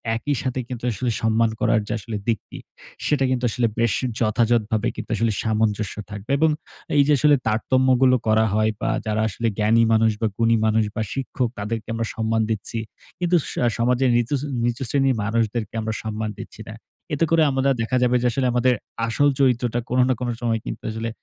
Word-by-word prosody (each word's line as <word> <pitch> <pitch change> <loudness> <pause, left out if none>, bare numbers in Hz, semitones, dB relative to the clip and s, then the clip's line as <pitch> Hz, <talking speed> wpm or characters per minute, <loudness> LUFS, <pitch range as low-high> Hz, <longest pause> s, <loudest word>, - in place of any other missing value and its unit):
একই 145 +5 -1
সাথে 130 0 -2
কিন্তু 120 -2 -7
আসলে 120 +3 -2
সম্মান 115 0 +2
করার 110 - +2 0.5
দিকটি 115 -2 -2 0.5
সেটা 145 -3 +2
কিন্তু 125 -1 -1
আসলে 115 +3 +1 0.5
যথাযথভাবে 110 -1 +1 0.6
সামঞ্জস্য 110 -2 0 0.2
থাকবে। 105 +3 -8
এবং 160 +1 +4 0.5
এই 140 - +7
যে, - - +3
আসলে 150 +2 +5
তারতম্যগুলো 130 +3 +3
করা 110 0 +4
হয় 110 +1 +2
বা - - 0 0.2
যারা 110 0 0
আসলে 115 +3 -2
জ্ঞানী 115 +2 +4
মানুষ 110 0 +4
বা 110 - +2
গুণী 115 0 +3
মানুষ 110 0 +3
বা 110 - -1
শিক্ষক 130 -2 -2
তাদেরকে 110 +1 -4
আমরা 115 0 -2
সম্মান 110 0 0
দিচ্ছি। 110 +1 -3 0.4
কিন্তু 175 0 +2
স - - -5 0.3
সমাজের 125 +2 +2
নিতুচ 125 +3 0 0.2
নিচু 120 +3 -1
শ্রেণীর 135 -1 +2
মানুষদেরকে 110 0 -1
আমরা 110 0 -2
সম্মান 110 0 -3
দিচ্ছি - - -9
না। - - -7 0.4
এতে 150 +3 +2
করে 165 -1 +5
আমাদের 135 +1 +2
দেখা 130 +3 0
যাবে 125 0 +3
যে, 125 - +3 0.2
আমাদের 125 +1 +3 0.3
আসল 145 +6 +2
চরিত্রটা 120 -3 +2
কোন 125 - +1
না - - +4
কোন 125 -1 -2
সময় 115 -2 0 0.3
আসলে 115 +1 -3
115 Hz, 165 wpm, -22 LUFS, 110-130 Hz, 0.6 s, এই